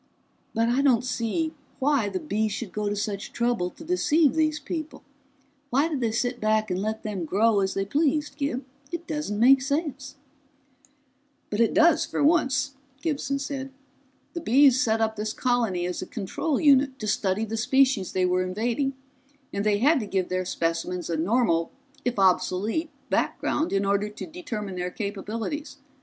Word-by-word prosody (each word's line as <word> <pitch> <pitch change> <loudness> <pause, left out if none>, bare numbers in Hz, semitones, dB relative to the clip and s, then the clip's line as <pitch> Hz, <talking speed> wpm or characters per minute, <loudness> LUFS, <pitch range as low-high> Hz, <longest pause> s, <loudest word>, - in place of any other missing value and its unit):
"But 225 +1 +2
I 245 +3 +2
don't 250 -4 +3
see 255 +6 -1 0.2
why 270 -6 +2
the 190 -2 -3
Bees 210 +7 -1
should 210 -2 -5
go 210 -1 -2
to 205 - -1
such 205 -1 -3
trouble 235 -7 0
to 325 - -13
deceive 320 -3 +3
these 310 -1 +1
people. 315 -3 -6 0.7
Why 280 +4 +2
did 290 -5 -2
they 230 -2 +1
sit 245 +2 -1
back 215 -1 +1
and 180 +1 -1
let 220 +1 -3
them 205 -5 -3
grow 205 +6 +3
as 190 -1 0
they 195 - 0
pleased, 295 +4 0
Gib? 280 -3 -2 0.3
It 340 0 -5
doesn't 300 -11 -3
make 260 +3 +6
sense!" 275 -1 -3 1.4
"But 210 - -2
it 230 - +3
does, 330 -1 +5
for - - -2
once," 280 -3 +2 0.3
Gibson 275 -3 -1
said. 275 -1 -4 0.6
"The 340 - -4
Bees 265 -1 +5
set 225 -2 +1
up 220 -1 0
this 215 +1 -2
colony 230 -8 0
as 180 0 -3
a 185 - -6
control 250 - -2
unit 275 -2 +4
to 215 - -5
study 205 0 0
the 220 +1 -4
species 250 -3 +2
they 185 -1 +1
were 180 0 +2
invading, 235 +9 -1 0.6
and 200 - -1
they 210 -1 +2
had 285 +7 +4
to 215 - -4
give 190 -2 -1
their 185 0 -1
specimens 170 +1 -2
a - - +1
normal 170 -1 +1 0.3
if 245 -2 -1
obsolete 195 - +1 0.2
background 310 - 0
in 195 0 +1
order 200 +1 +1
to 210 - -8
determine 220 - -6
their 180 0 -2
capabilities. 225 - -5
230 Hz, 175 wpm, -26 LUFS, 200-280 Hz, 1.4 s, make